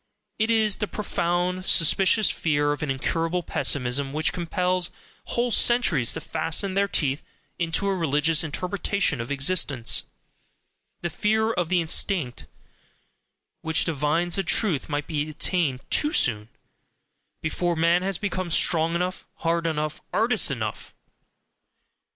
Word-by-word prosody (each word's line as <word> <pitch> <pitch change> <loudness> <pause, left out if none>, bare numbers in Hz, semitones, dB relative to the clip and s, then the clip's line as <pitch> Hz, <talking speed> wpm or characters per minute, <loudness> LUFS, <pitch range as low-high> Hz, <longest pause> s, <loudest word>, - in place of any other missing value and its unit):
It 220 +1 +1
is 220 -3 +2
the 210 - -2
profound, 180 -2 -2
suspicious 190 +5 +4
fear 145 -2 +1
of 145 - -3
an 150 - -3
incurable 165 +6 -1
pessimism 135 -1 -1
which 155 0 0
compels 180 +1 -1 0.4
whole 240 0 -1
centuries 200 - +3
to - - -5
fasten 165 +5 0
their 200 +1 +2
teeth 140 -6 0 0.4
into 170 +4 0
a 195 - +1
religious 160 -1 +2
interpretation 180 - -1
of 115 - -7
existence: 140 -4 0 1.0
the 175 - -3
fear 220 +6 +1
of 175 -5 -1
the 180 -1 +2
instinct 160 -5 0 1.1
which 160 -1 +2
divines 165 +3 0
that 195 -3 -2
truth 180 - +1
might 145 0 -2
be 150 -1 -2
attained 155 -4 0
TOO 300 0 +2
soon, 105 -2 +1 0.9
before 175 +2 -1
man 170 +2 +3
has 190 -1 -1
become 185 -3 -3
strong 165 0 +3
enough, 180 +2 -3
hard 165 0 -1
enough, 155 -1 -3
artist 220 -4 +2
enough.... 110 -6 -5
170 Hz, 130 wpm, -25 LUFS, 150-185 Hz, 1.1 s, suspicious